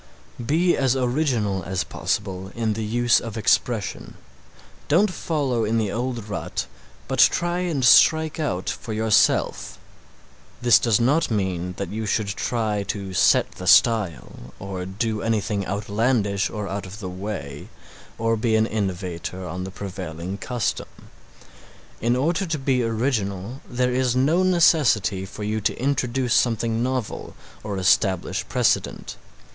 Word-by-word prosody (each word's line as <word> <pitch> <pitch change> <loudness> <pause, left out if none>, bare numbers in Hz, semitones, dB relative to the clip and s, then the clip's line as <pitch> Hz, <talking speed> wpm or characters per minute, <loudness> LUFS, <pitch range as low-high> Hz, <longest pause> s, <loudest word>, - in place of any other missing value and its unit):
Be 170 +8 +2
as 135 -2 +1
original 125 -7 0
as 95 +1 -2
possible 95 -2 -3
in 115 -2 0
the 110 +1 -4
use 120 +2 +3
of 115 -1 -7
expression. 110 -1 0 0.7
Don't 185 +7 +3
follow 140 -9 -1
in 110 +2 0
the 105 -3 0
old 120 -2 -3
rut 100 - -4 0.4
but - - -3
try 175 +1 +3
and 165 -8 0
strike 160 +6 +5
out 95 - -2
for 110 - -4
yourself. 110 0 +2 0.8
This 120 -1 +5
does 115 -4 +2
not 140 +7 +2
mean 95 -4 -2
that 100 -3 -4
you 110 +1 -4
should 105 0 0
try 105 0 -1
to 100 -2 -4
set - - +3
the 90 - -8
style, 85 - +2
or 95 -2 -6
do 105 +2 -2
anything 105 -3 -1
outlandish 105 +1 0
or 105 -2 -5
out 95 +1 -4
of 95 +3 -10
the 95 - -5
way, 90 -7 -6 0.5
or 115 0 +1
be 110 0 +1
an 110 0 +3
innovator 95 -4 -4
on 90 +2 -5
the - - -5
prevailing 95 -1 -6
custom. 125 -3 -2 1.1
In 120 +2 +2
order 170 +8 0
to 160 -1 -1
be 135 -2 +1
original 115 -1 -2
there 125 0 0
is 125 -1 +1
no 150 +8 +3
necessity 145 - +3
for 105 +2 -8
you 110 +1 -2
to - - -1
introduce 130 -1 0
something 115 -2 +1
novel 130 -3 -3 0.3
or 100 -2 -4
establish 95 -1 +2
a - - -11
precedent. - - 0
110 Hz, 145 wpm, -23 LUFS, 100-125 Hz, 1.1 s, strike